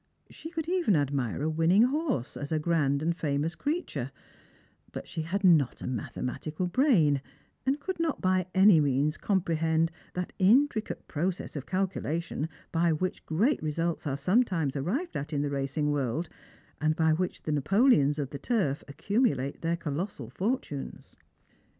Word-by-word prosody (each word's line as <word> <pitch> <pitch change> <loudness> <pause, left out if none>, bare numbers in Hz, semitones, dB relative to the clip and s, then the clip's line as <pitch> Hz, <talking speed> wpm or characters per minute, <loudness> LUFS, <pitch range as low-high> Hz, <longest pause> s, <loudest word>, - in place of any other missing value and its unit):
She 320 - -9
could 325 -2 -4
even 350 - +2
admire 140 -3 0
a 160 - +1
winmng 170 +8 +4
horse 270 - -1
as 145 +1 -6
a 160 - +2
grand 150 -3 +1
and 170 +1 +1
famous 150 0 -1
creature; 285 - -3 0.8
but - - -7
she 160 - -4
had 190 +6 -2
not 160 -8 +4
a - - -7
mathematical 130 - -3
brain, 175 - +3 0.5
and 275 +2 +2
could 375 +3 -4
not 330 -3 0
by 185 -1 +1
any 190 -3 +7
means 145 +1 +1
comprehend 165 -4 +1 0.2
that 180 0 -3
intricate 225 +4 +2
process 175 +4 -3
of 140 -2 -5
calculation 170 -4 -2 0.2
by 170 0 +2
which 180 +4 -2
great 215 - +2
results 165 +1 -2
are 135 -1 -1
sometimes 170 - +1
arrived 230 - -2
at 145 +2 -4
in 145 -1 0
the 145 - -2
racing 140 +2 -1
world, 145 +3 -1 0.5
and 155 0 +2
by 160 0 +3
which 180 +3 -2
the 155 - -2
Napoleons 150 - +3
of 140 -3 -3
the 140 - -6
turf 190 - 0
accumulate 150 - 0
their 170 +1 0
colossal 150 - -4
fortunes. 185 - -4
165 Hz, 155 wpm, -29 LUFS, 145-195 Hz, 0.8 s, any